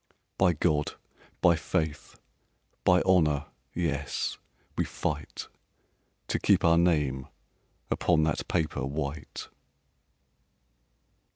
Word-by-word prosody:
"By 90 Hz, -2 st, +5 dB
God, 75 Hz, -1 st, +1 dB, 0.5 s
by 85 Hz, -2 st, +6 dB
faith, 80 Hz, -1 st, -3 dB, 0.6 s
by 90 Hz, -1 st, +5 dB
honor, 75 Hz, -6 st, +3 dB, 0.3 s
yes! 70 Hz, -5 st, -2 dB, 0.4 s
We -, -, +1 dB
fight -, -, -4 dB, 0.8 s
To -, -, 0 dB
keep -, -, +3 dB
our 85 Hz, 0 st, +5 dB
name 75 Hz, -6 st, +1 dB, 0.6 s
upon 80 Hz, -, +3 dB
that 80 Hz, -1 st, -1 dB
paper 80 Hz, -3 st, -1 dB
white." 70 Hz, +2 st, -4 dB
80 Hz, 90 wpm, -28 LUFS, 75-85 Hz, 0.8 s, by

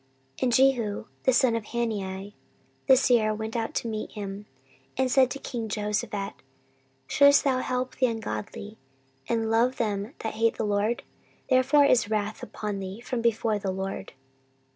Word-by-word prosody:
14:019:002 -, -, -13 dB
And 245 Hz, -2 st, +2 dB
Jehu 235 Hz, -5 st, +2 dB, 0.2 s
the 260 Hz, -, +5 dB
son 245 Hz, -2 st, +4 dB
of 225 Hz, -2 st, -3 dB
Hanani 205 Hz, -4 st, -3 dB, 0.5 s
the 265 Hz, -1 st, +7 dB
seer 230 Hz, -5 st, +3 dB
went 220 Hz, +1 st, -5 dB
out 225 Hz, -1 st, -2 dB
to -, -, -1 dB
meet 215 Hz, -1 st, -4 dB
him, 205 Hz, -1 st, -6 dB, 0.5 s
and 260 Hz, -1 st, +1 dB
said 260 Hz, -1 st, +5 dB
to 275 Hz, -, -4 dB
king 235 Hz, -5 st, -5 dB
Jehoshaphat, 210 Hz, -1 st, -2 dB, 0.7 s
Shouldest 280 Hz, -, +5 dB
thou 265 Hz, -2 st, +2 dB
help 255 Hz, 0 st, -2 dB
the 255 Hz, -, +3 dB
ungodly, 220 Hz, -2 st, -5 dB, 0.5 s
and 225 Hz, -1 st, 0 dB
love 240 Hz, +3 st, +2 dB
them 210 Hz, +2 st, -2 dB
that 220 Hz, -, -3 dB
hate 225 Hz, +1 st, +1 dB
the 220 Hz, -, -1 dB
LORD? 210 Hz, +3 st, 0 dB, 0.5 s
therefore 265 Hz, +3 st, +5 dB
is 245 Hz, -6 st, +3 dB
wrath 215 Hz, 0 st, -2 dB
upon 210 Hz, -2 st, -5 dB
thee 190 Hz, +2 st, -6 dB
from 245 Hz, 0 st, -3 dB
before 225 Hz, -2 st, +1 dB
the 195 Hz, -1 st, -3 dB
LORD. 190 Hz, +1 st, -4 dB
225 Hz, 165 wpm, -27 LUFS, 210-250 Hz, 0.7 s, the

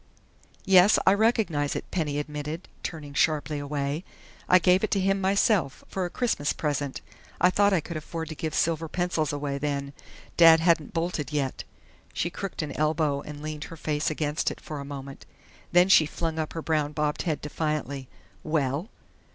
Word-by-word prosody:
"Yes, 190 Hz, +2 st, +6 dB
I 190 Hz, -, +6 dB
recognize 200 Hz, -, +1 dB
it," -, -, -4 dB
Penny 150 Hz, -5 st, -1 dB
admitted, 150 Hz, +3 st, -5 dB
turning 150 Hz, -4 st, -6 dB
sharply 150 Hz, 0 st, +1 dB
away. 145 Hz, +2 st, -3 dB, 0.5 s
"I 185 Hz, -, +8 dB
gave 180 Hz, +2 st, +3 dB
it 215 Hz, -, +1 dB
to 200 Hz, -, +1 dB
him 195 Hz, +1 st, +1 dB
myself, 190 Hz, -, +2 dB
for 190 Hz, -1 st, -2 dB
a -, -, -3 dB
Christmas 190 Hz, -, 0 dB
present. 145 Hz, -3 st, -2 dB, 0.4 s
I 180 Hz, -, +5 dB
thought 205 Hz, +1 st, +3 dB
I 185 Hz, -4 st, +2 dB
could 165 Hz, +1 st, -6 dB
afford 160 Hz, +1 st, -5 dB
to -, -, -4 dB
give 155 Hz, 0 st, -3 dB
silver 165 Hz, 0 st, +1 dB
pencils 170 Hz, -3 st, -1 dB
away 145 Hz, -1 st, -3 dB
then. 140 Hz, -1 st, -2 dB, 0.4 s
Dad 165 Hz, -1 st, +8 dB
hadn't 165 Hz, -1 st, +2 dB
bolted 165 Hz, -4 st, -2 dB
yet 140 Hz, -3 st, -2 dB, 0.2 s
" -, -, -30 dB
She 175 Hz, -, -1 dB
crooked 195 Hz, -3 st, -4 dB
an 150 Hz, -, -5 dB
elbow 155 Hz, -2 st, +1 dB
and 150 Hz, 0 st, -9 dB
leaned 155 Hz, -1 st, -5 dB
her 165 Hz, -, -10 dB
face 150 Hz, -1 st, -1 dB
against 150 Hz, 0 st, -1 dB
it -, -, -8 dB
for 150 Hz, -2 st, -7 dB
a -, -, -5 dB
moment. 140 Hz, -, -8 dB, 0.4 s
Then 175 Hz, +1 st, +6 dB
she 165 Hz, -5 st, +6 dB
flung 160 Hz, 0 st, -3 dB
up 155 Hz, -, -3 dB
her 165 Hz, -, -5 dB
brown 150 Hz, -2 st, 0 dB
bobbed 150 Hz, 0 st, -1 dB
head 160 Hz, -4 st, -1 dB
defiantly. 150 Hz, -3 st, -3 dB, 0.3 s
"Well?" 155 Hz, -, -1 dB
155 Hz, 180 wpm, -27 LUFS, 145-175 Hz, 0.5 s, I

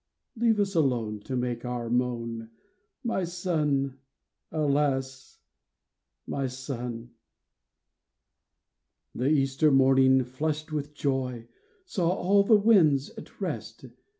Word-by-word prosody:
Leave 225 Hz, -2 st, +2 dB
us 200 Hz, -1 st, +1 dB
alone 120 Hz, -, 0 dB
to 130 Hz, +5 st, -5 dB
make 125 Hz, -1 st, -2 dB
our 125 Hz, -1 st, -3 dB
moan 115 Hz, -2 st, -2 dB, 0.3 s
— -, -, -48 dB
My 190 Hz, -, 0 dB
son! 150 Hz, -7 st, -1 dB, 0.5 s
alas, 140 Hz, -3 st, -1 dB, 0.9 s
my 135 Hz, -1 st, -2 dB
son! 125 Hz, -2 st, -6 dB, 1.0 s
" -, -, -57 dB
The 125 Hz, -, -1 dB
Easter 135 Hz, 0 st, +3 dB
morning, 130 Hz, -1 st, +5 dB
flushed 150 Hz, +5 st, -3 dB
with 150 Hz, -1 st, -4 dB
joy, 130 Hz, -5 st, -2 dB, 0.4 s
Saw 180 Hz, -, 0 dB
all 195 Hz, +2 st, +3 dB
the 210 Hz, +2 st, +5 dB
winds 170 Hz, -11 st, +4 dB
at -, -, -13 dB
rest. -, -, -5 dB
135 Hz, 110 wpm, -27 LUFS, 125-155 Hz, 1.0 s, morning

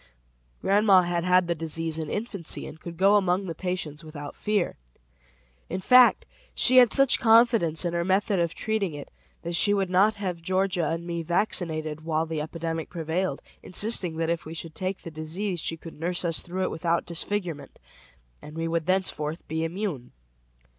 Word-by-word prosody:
Grandma 200 Hz, -2 st, +5 dB
had 175 Hz, -1 st, -1 dB
had 180 Hz, 0 st, +4 dB
the 170 Hz, -, +1 dB
disease 165 Hz, 0 st, -1 dB
in 155 Hz, -2 st, -4 dB
infancy 205 Hz, -6 st, -3 dB
and 160 Hz, -, -10 dB
could 170 Hz, 0 st, -9 dB
go 195 Hz, +3 st, +5 dB
among 190 Hz, 0 st, +1 dB
the 170 Hz, -, -4 dB
patients 165 Hz, -3 st, -4 dB
without 150 Hz, -2 st, -8 dB
fear. 210 Hz, -4 st, -1 dB, 0.9 s
In 185 Hz, -, -3 dB
fact, 250 Hz, +5 st, +6 dB, 0.3 s
she 255 Hz, 0 st, +4 dB
had 245 Hz, -3 st, +7 dB
such 275 Hz, -1 st, +4 dB
confidence 225 Hz, -8 st, +4 dB
in 170 Hz, -, -1 dB
her 170 Hz, 0 st, 0 dB
method 190 Hz, +1 st, +1 dB
of 170 Hz, -1 st, -1 dB
treating 210 Hz, -7 st, -2 dB
it, 145 Hz, -, -9 dB, 0.3 s
that 170 Hz, -, -4 dB
she 205 Hz, +4 st, +2 dB
would 195 Hz, -2 st, -1 dB
not 200 Hz, +4 st, +4 dB
have 185 Hz, -4 st, -4 dB
Georgia 185 Hz, -2 st, 0 dB
and 165 Hz, +1 st, -3 dB
me 170 Hz, -1 st, -3 dB
vaccinated 160 Hz, -3 st, -1 dB
while 160 Hz, 0 st, 0 dB
the 160 Hz, -1 st, -3 dB
epidemic 165 Hz, +1 st, -4 dB
prevailed, 170 Hz, +2 st, -2 dB, 0.2 s
insisting 185 Hz, -3 st, 0 dB
that 165 Hz, 0 st, -1 dB
if 170 Hz, -2 st, -2 dB
we 160 Hz, +1 st, -8 dB
should 165 Hz, -1 st, -5 dB
take 185 Hz, +2 st, -4 dB
the 165 Hz, -, -7 dB
disease 170 Hz, +5 st, -4 dB
she 165 Hz, +1 st, -2 dB
could 165 Hz, -1 st, -12 dB
nurse 175 Hz, +2 st, -2 dB
us 165 Hz, -2 st, 0 dB
through 185 Hz, +2 st, -4 dB
it -, -, -1 dB
without 170 Hz, +1 st, 0 dB
disfigurement, 175 Hz, -2 st, -4 dB, 0.6 s
and 150 Hz, +1 st, -11 dB
we 165 Hz, 0 st, -1 dB
would 165 Hz, 0 st, -1 dB
thenceforth 175 Hz, -4 st, -1 dB
be 160 Hz, +1 st, -2 dB
immune. 165 Hz, -, -4 dB
170 Hz, 180 wpm, -26 LUFS, 160-195 Hz, 0.9 s, had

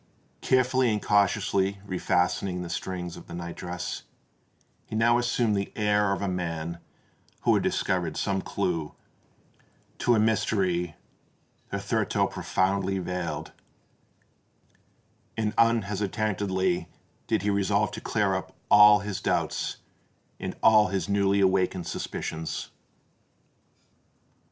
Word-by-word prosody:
Carefully 130 Hz, -1 st, +3 dB
and 105 Hz, -, 0 dB
cautiously 100 Hz, -1 st, +1 dB
refastening 90 Hz, 0 st, 0 dB
the 85 Hz, -, -6 dB
strings 90 Hz, -2 st, -4 dB
of -, -, -12 dB
the 85 Hz, -, -8 dB
night 85 Hz, 0 st, -6 dB
dress, 90 Hz, -1 st, -5 dB, 0.9 s
he -, -, -6 dB
now 120 Hz, +2 st, +4 dB
assumed 120 Hz, -3 st, +1 dB
the 100 Hz, 0 st, -2 dB
air 105 Hz, -1 st, +2 dB
of 100 Hz, 0 st, -1 dB
a -, -, 0 dB
man 85 Hz, -2 st, -3 dB, 0.6 s
who -, -, +3 dB
had -, -, +3 dB
discovered -, -, -1 dB
some 95 Hz, -1 st, 0 dB
clue 90 Hz, -7 st, -2 dB, 1.0 s
to 120 Hz, -, +3 dB
a -, -, +3 dB
mystery 95 Hz, -6 st, +1 dB, 0.8 s
hitherto -, -, 0 dB
profoundly 95 Hz, +1 st, 0 dB
veiled; 85 Hz, -4 st, -4 dB, 1.9 s
and 110 Hz, -1 st, 0 dB
unhesitatingly 100 Hz, -5 st, +1 dB, 0.4 s
did -, -, 0 dB
he 105 Hz, -, +1 dB
resolve 100 Hz, +1 st, +1 dB
to 110 Hz, +1 st, -7 dB
clear 105 Hz, -3 st, +1 dB
up 95 Hz, -, -4 dB, 0.2 s
all 105 Hz, 0 st, +8 dB
his 105 Hz, -2 st, -4 dB
doubts -, -, -1 dB, 0.6 s
and -, -, -4 dB
all 110 Hz, -1 st, +6 dB
his 95 Hz, -2 st, -2 dB
newly 100 Hz, 0 st, +2 dB
awakened 95 Hz, -1 st, +2 dB
suspicions. 80 Hz, 0 st, -4 dB
100 Hz, 115 wpm, -27 LUFS, 90-105 Hz, 1.9 s, all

